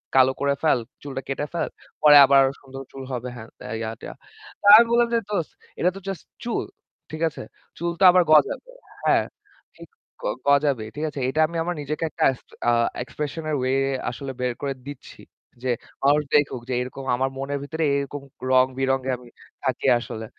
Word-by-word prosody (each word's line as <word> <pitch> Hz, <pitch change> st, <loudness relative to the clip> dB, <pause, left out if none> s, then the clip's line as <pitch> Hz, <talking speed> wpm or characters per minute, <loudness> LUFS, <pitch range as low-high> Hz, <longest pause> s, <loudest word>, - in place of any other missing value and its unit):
কালো 130 Hz, 0 st, +6 dB
করে 140 Hz, 0 st, +2 dB
ফেল। 155 Hz, -5 st, +4 dB, 0.2 s
চুলটা 135 Hz, -2 st, -5 dB
কেটে 140 Hz, +2 st, -2 dB
ফেল। 170 Hz, -, -1 dB, 0.3 s
পরে 150 Hz, -1 st, +8 dB
আবার 135 Hz, 0 st, +6 dB, 0.2 s
সুন্দর 135 Hz, -1 st, -10 dB
চুল 135 Hz, -1 st, -8 dB
হবে। 125 Hz, 0 st, -4 dB
হ্যান-তেন, 110 Hz, 0 st, -11 dB
ইয়া-টিয়া।" 110 Hz, 0 st, -6 dB, 0.5 s
তা -, -, -9 dB
আমি 230 Hz, -, +8 dB
বললাম 235 Hz, 0 st, +4 dB
যে 230 Hz, -, +4 dB
"দোস্ত, 180 Hz, -7 st, -2 dB, 0.3 s
এটা 180 Hz, -, +3 dB
তো -, -, -7 dB
জাস্ট 195 Hz, -5 st, -5 dB, 0.2 s
চুল, 235 Hz, -1 st, -1 dB, 0.5 s
ঠিক 155 Hz, 0 st, -6 dB
আছে? -, -, -10 dB, 0.4 s
চুলতো 170 Hz, +2 st, -4 dB
আবার 180 Hz, 0 st, +5 dB
গজাবে, 155 Hz, -, +3 dB, 0.4 s
হ্যাঁ? -, -, +4 dB, 0.5 s
ঠিক -, -, -13 dB, 0.3 s
গ -, -, -17 dB, 0.2 s
গজাবেই। 140 Hz, -6 st, +2 dB
ঠিক 150 Hz, -, -4 dB
আছে? 145 Hz, -, -7 dB
এইটা 135 Hz, +4 st, -1 dB
আমি 170 Hz, +1 st, -6 dB
আমার 175 Hz, +1 st, -2 dB
নিজেকে 150 Hz, +3 st, -4 dB
একটা -, -, -3 dB
এক্স 130 Hz, -, -10 dB, 0.2 s
অ্যা 120 Hz, -, +3 dB, 0.3 s
এক্সপ্রেশন 150 Hz, +4 st, -5 dB
এর 155 Hz, -, 0 dB
ওয়ে 130 Hz, +1 st, 0 dB, 0.4 s
আসলে 135 Hz, +2 st, -6 dB
বের 125 Hz, -1 st, 0 dB
করে 140 Hz, -1 st, -2 dB
দিচ্ছি। 140 Hz, -2 st, -10 dB, 0.4 s
যে 130 Hz, -, -1 dB, 0.3 s
মানুষ 145 Hz, +2 st, +4 dB
দেখুক 140 Hz, -4 st, +2 dB
যে 130 Hz, -, -1 dB
এরকম 130 Hz, +2 st, -7 dB
আমার 130 Hz, +2 st, 0 dB
মনের 140 Hz, +1 st, -3 dB
ভিতরে 160 Hz, +3 st, -3 dB
এরকম 140 Hz, 0 st, -3 dB, 0.3 s
রং-বিরঙে 130 Hz, +1 st, +2 dB
আমি 125 Hz, 0 st, -16 dB, 0.4 s
থাকি -, -, -1 dB
আসলে।" 110 Hz, -1 st, -7 dB
140 Hz, 175 wpm, -24 LUFS, 130-155 Hz, 0.5 s, পরে